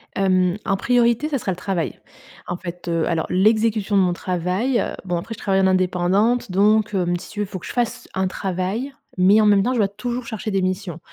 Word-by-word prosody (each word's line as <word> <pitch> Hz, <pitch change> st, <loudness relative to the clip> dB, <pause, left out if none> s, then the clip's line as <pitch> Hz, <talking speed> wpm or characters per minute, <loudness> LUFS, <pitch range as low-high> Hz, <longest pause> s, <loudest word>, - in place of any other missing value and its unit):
Hem, 185 Hz, -1 st, +2 dB
en -, -, +1 dB
priorité, 240 Hz, +5 st, +2 dB
ça 285 Hz, -, 0 dB
sera 205 Hz, -5 st, -2 dB
le -, -, -3 dB
travail. 180 Hz, -2 st, -3 dB, 0.5 s
En 175 Hz, -, -3 dB
fait, 175 Hz, -1 st, -8 dB
heu, 165 Hz, -1 st, 0 dB
alors 165 Hz, -2 st, -1 dB
l'exécution 215 Hz, +2 st, +2 dB
de 195 Hz, -, +5 dB
mon 180 Hz, -1 st, +2 dB
travail, 185 Hz, +9 st, -1 dB
heu, -, -, -2 dB
bon 180 Hz, -2 st, -1 dB
après 225 Hz, +6 st, -6 dB
je -, -, -15 dB
travaille 195 Hz, -1 st, +1 dB
en 190 Hz, -, +4 dB
indépendante, 185 Hz, +5 st, +1 dB
donc, 210 Hz, +2 st, +3 dB
hem, 175 Hz, -1 st, +1 dB
si -, -, -11 dB
tu 210 Hz, -, -7 dB
veux, 210 Hz, -, +1 dB
il -, -, -12 dB
faut 185 Hz, -, -6 dB
que -, -, -10 dB
je -, -, -6 dB
fasse 240 Hz, -2 st, -2 dB
un 190 Hz, 0 st, +1 dB
travail, 190 Hz, +8 st, -3 dB, 0.3 s
mais 195 Hz, +4 st, +5 dB
en 215 Hz, -, +3 dB
même 205 Hz, -1 st, +5 dB
temps, 250 Hz, -, 0 dB
je 250 Hz, -, -1 dB
dois 205 Hz, -, +3 dB
toujours 240 Hz, +4 st, -4 dB
chercher 220 Hz, -2 st, -5 dB
des 195 Hz, -1 st, +1 dB
missions. 185 Hz, -2 st, -3 dB
195 Hz, 235 wpm, -21 LUFS, 180-220 Hz, 0.5 s, de